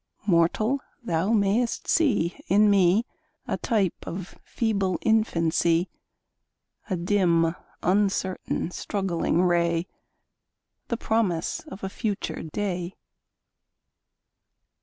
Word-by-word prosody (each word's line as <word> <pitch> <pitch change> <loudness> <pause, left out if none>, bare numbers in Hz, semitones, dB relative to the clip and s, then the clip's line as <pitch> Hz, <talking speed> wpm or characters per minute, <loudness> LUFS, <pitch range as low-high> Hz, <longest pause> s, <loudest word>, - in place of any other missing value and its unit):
Mortal! 205 +8 +2 0.2
thou 175 0 0
mayst 225 +2 +1
see 205 - +2
in 205 +3 +5
me 195 +3 +4 0.4
A - - 0
type 205 -7 +1
of 180 +2 -6
feeble 200 -6 0
infancy, 170 -5 +2 1.0
A 185 - 0
dim, 170 -3 +2 0.3
uncertain, 190 -2 0
struggling 180 -3 -1
ray, 170 -1 +2 1.0
The 235 - -2
promise 200 -8 0
of 205 -10 -10
a - - -1
future 205 0 -3
day! 180 +1 -3
190 Hz, 90 wpm, -26 LUFS, 170-210 Hz, 1.0 s, in